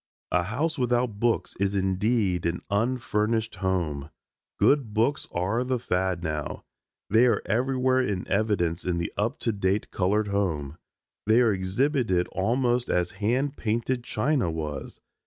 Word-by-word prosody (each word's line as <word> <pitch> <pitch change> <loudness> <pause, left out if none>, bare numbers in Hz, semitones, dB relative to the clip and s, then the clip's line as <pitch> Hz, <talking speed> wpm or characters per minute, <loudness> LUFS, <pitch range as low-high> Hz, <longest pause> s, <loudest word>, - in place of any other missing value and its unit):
A 90 - +3
house 145 - -2
without 120 -3 0
books 120 0 0
is 100 0 +1
indeed 95 -1 +1
an 85 +1 -3
unfurnished 110 -1 0
home. 85 -7 -1 0.5
Good 130 -7 +3
books 120 +7 +1
are 100 +8 0
the 130 0 0
fad 90 -5 -1
now. 75 -2 -3 0.5
They 115 +4 +6
are 120 - +1
everywhere 130 +3 +2
in 100 -7 -2
evidence 95 -5 0
in 90 -1 -1
the 85 - -3
up 105 +3 -1
to 115 - +1
date 100 0 -1
colored 105 +3 +1
home. 80 -8 -1 0.5
They 110 +2 +5
are 115 -4 +4
exhibited 95 - +1
almost 120 +4 0
as 90 -1 +1
hand 130 +7 0
painted 120 +3 -1
china 125 - 0
was. 75 -3 -5
105 Hz, 140 wpm, -26 LUFS, 90-120 Hz, 0.5 s, They